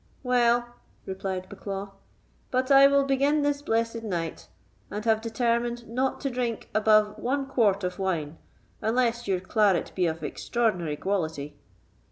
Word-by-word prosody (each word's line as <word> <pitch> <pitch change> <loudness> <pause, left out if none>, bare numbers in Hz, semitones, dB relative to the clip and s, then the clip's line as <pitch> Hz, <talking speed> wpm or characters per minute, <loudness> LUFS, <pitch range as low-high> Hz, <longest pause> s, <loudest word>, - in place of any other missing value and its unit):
"Well," 240 -1 +2 0.3
replied 190 -1 -4
Bucklaw, 195 0 -6 0.6
"but 255 +1 0
I 275 0 +9
will 280 0 +4
begin 280 +2 +2
this 290 0 0
blessed 230 -3 -1
night, 175 -7 -4 0.4
and 210 +2 -5
have 220 -1 +3
determined 235 +1 -1
not 255 +4 -1
to 275 - -2
drink 240 -2 -3
above 215 0 +3
one 270 +4 -1
quart 210 -7 +2
of 180 0 -3
wine, 165 -5 -2 0.4
unless 235 +1 0
your 190 -2 +1
claret 195 -1 +1
be 180 -2 +1
of 160 -1 -4
extraordinary 180 -1 -1
quality." 160 -7 -2
225 Hz, 140 wpm, -27 LUFS, 190-245 Hz, 0.6 s, I